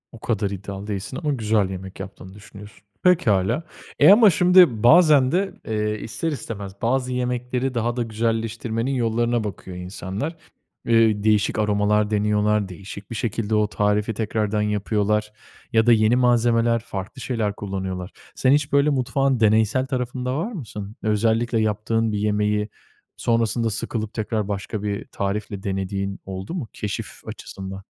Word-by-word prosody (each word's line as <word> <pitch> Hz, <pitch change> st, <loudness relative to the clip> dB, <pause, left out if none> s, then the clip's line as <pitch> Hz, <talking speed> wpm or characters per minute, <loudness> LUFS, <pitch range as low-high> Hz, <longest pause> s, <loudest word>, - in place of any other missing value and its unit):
O 115 Hz, -, -12 dB
kadar 105 Hz, -3 st, -1 dB
iddialı 100 Hz, +1 st, -6 dB
değilsin 105 Hz, +4 st, -4 dB
ama 150 Hz, -1 st, +1 dB
güzel 110 Hz, -5 st, +1 dB
yemek 95 Hz, 0 st, -8 dB
yaptığını 95 Hz, -1 st, -9 dB
düşünüyorsun. 105 Hz, 0 st, -13 dB, 0.2 s
Pekâlâ. 120 Hz, -, +3 dB, 0.4 s
Eee, 150 Hz, +6 st, +8 dB
ama 215 Hz, +1 st, +8 dB
şimdi 180 Hz, -, +5 dB
bazen 150 Hz, -2 st, +6 dB
de, 190 Hz, +3 st, 0 dB
eee, 105 Hz, -1 st, -1 dB
ister 160 Hz, +10 st, -3 dB
istemez 100 Hz, -8 st, -6 dB
bazı 130 Hz, +2 st, 0 dB
yemekleri 125 Hz, +1 st, -2 dB
daha 120 Hz, 0 st, -1 dB
da 120 Hz, -, 0 dB
güzelleştirmenin 115 Hz, +2 st, -2 dB
yollarına 120 Hz, -1 st, +1 dB
bakıyor 95 Hz, -3 st, -7 dB
insanlar. 95 Hz, -, -5 dB, 0.5 s
Eee, 115 Hz, -3 st, +3 dB
değişik 105 Hz, 0 st, +2 dB
aromalar 105 Hz, 0 st, +2 dB
deniyorlar, 105 Hz, -1 st, +1 dB
değişik 100 Hz, +2 st, -10 dB
bir -, -, -4 dB
şekilde 110 Hz, 0 st, -1 dB
o 105 Hz, 0 st, +3 dB
tarifi 105 Hz, +1 st, 0 dB
tekrardan 105 Hz, -1 st, -1 dB
yapıyorlar 105 Hz, 0 st, 0 dB, 0.4 s
ya 110 Hz, 0 st, +4 dB
da 120 Hz, -, +6 dB
yeni 110 Hz, +1 st, +4 dB
malzemeler 120 Hz, -1 st, +3 dB
farklı 110 Hz, +2 st, -7 dB
şeyler 110 Hz, -5 st, -1 dB
kullanıyorlar. 95 Hz, -2 st, -5 dB, 0.2 s
Sen 130 Hz, -, +2 dB
hiç 145 Hz, 0 st, +2 dB
böyle 140 Hz, +1 st, +4 dB
mutfağın 135 Hz, -1 st, +1 dB
deneysel 110 Hz, +3 st, +3 dB
tarafında 125 Hz, 0 st, -2 dB
var 205 Hz, +10 st, -2 dB
mısın? 110 Hz, -, -7 dB
Özellikle 115 Hz, +2 st, +1 dB
yaptığın 110 Hz, +1 st, 0 dB
bir 105 Hz, -, -1 dB
yemeği 105 Hz, 0 st, 0 dB, 0.5 s
sonrasında 115 Hz, 0 st, +1 dB
sıkılıp 110 Hz, 0 st, -4 dB
tekrar 110 Hz, -2 st, -2 dB
başka 100 Hz, +1 st, -4 dB
bir 100 Hz, -1 st, -3 dB
tarifle 100 Hz, 0 st, -4 dB
denediğin 95 Hz, 0 st, -3 dB
oldu 95 Hz, -, -6 dB
mu, 165 Hz, -10 st, -4 dB
keşif 105 Hz, -2 st, -5 dB
açısından? 95 Hz, 0 st, -8 dB
110 Hz, 145 wpm, -23 LUFS, 105-120 Hz, 0.5 s, Eee